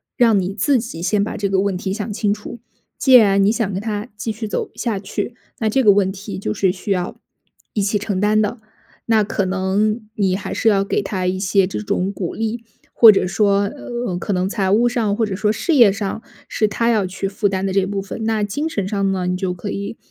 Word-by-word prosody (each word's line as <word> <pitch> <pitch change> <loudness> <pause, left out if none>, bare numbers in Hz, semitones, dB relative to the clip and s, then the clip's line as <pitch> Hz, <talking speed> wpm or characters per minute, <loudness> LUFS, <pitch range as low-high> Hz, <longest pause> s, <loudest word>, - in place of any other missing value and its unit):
让 230 -6 +4
你 190 +1 -2
自 245 +7 +2
己 220 -8 -7
先 200 +3 +1
把 - - -4
这 200 -1 -1
个 195 - +2
问 195 -1 0
题 190 +1 -3
想 205 +1 -4
清 205 0 0
楚。 210 +3 -8 0.4
既 265 - +3
然 200 -4 +6
你 200 - +4
想 220 -4 -1
跟 190 - -3
他 210 0 -3
继 215 +2 -3
续 220 +1 -5
走 205 - -3
下 220 -5 -2
去， 205 +4 -4 0.2
那 220 - +1
这 265 +5 +2
个 210 - +7
问 195 -1 +2
题 195 0 -7
就 200 - -2
是 195 -2 +1
需 190 +2 -6
要 180 -2 -2 0.5
一 210 - 0
起 200 +1 +1
承 200 -2 -2
担 210 +1 +3
的。 215 +3 -2 0.5
那 225 -2 +4
可 205 0 -1
能 200 +4 0
你 195 -3 +1
还 200 - -5
是 225 - +2
要 195 -2 +2
给 - - 0
他 190 -2 -3
一 185 +1 0
些 195 0 +2
这 195 - -4
种 200 -2 -1
鼓 180 -4 -4
励， 225 +1 -3 0.3
或 225 -2 +9
者 195 - +1
说， 200 +1 +2
呃， 240 -1 -4
可 180 - -4
能 185 -1 0
财 195 -2 -1
务 230 +4 +4
上， 230 -4 0
或 230 - +2
者 195 -3 -4
说 210 +1 +1
事 310 +9 0
业 235 -7 +7
上 200 +2 -4 0.3
是 215 - 0
他 230 +3 0
要 215 -4 +2
去 190 +2 -4
负 200 +1 0
担 190 0 -2
的 190 - -1
这 195 -1 +2
部 200 0 -3
分。 200 +3 -6
那 220 -1 0
精 290 +11 -3
神 200 -10 -2
上 195 -2 0
呢， 185 -1 -2
你 180 - 0
就 185 -1 -2
可 180 +4 -6
以， 200 +3 -5
205 Hz, 260 characters per minute, -20 LUFS, 195-220 Hz, 0.5 s, 或